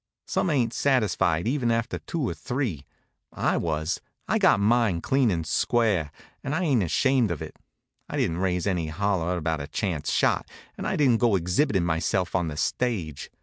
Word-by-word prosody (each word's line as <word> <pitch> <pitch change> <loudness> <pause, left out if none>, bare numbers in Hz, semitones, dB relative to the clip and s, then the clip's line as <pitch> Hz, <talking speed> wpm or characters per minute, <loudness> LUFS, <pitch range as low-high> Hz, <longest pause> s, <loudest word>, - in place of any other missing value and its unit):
Some 185 - 0
ain't 125 -6 +1
satisfied, 105 - +1
even 125 -2 0
after 115 +1 -1
two 155 -7 -3
or - - -2
three. 120 - -3 0.4
I - - 0
was. 80 +1 -1 0.3
I - - +1
got - - +5
mine, 110 -3 +2
clean 130 +6 +2
and 85 -4 -1
square, 100 -7 +1 0.3
and 140 - -2
I 185 - 0
ain't 135 -9 +2
ashamed 125 - +2
of 85 - -3
it. - - -8 0.5
I - - -3
didn't 85 +1 0
raise 90 -2 0
any 90 -5 0
holler 90 0 -1
about 80 -2 -1
a 70 - -6
chance 85 -2 -2
shot, - - +1 0.3
and - - -4
I - - 0
didn't 130 -6 +4
go 115 -4 +4
exhibitin' 90 - +1
myself 85 +3 0
on 90 -2 +1
the 75 -2 -5
stage. 85 - -2
95 Hz, 180 wpm, -26 LUFS, 85-120 Hz, 0.5 s, got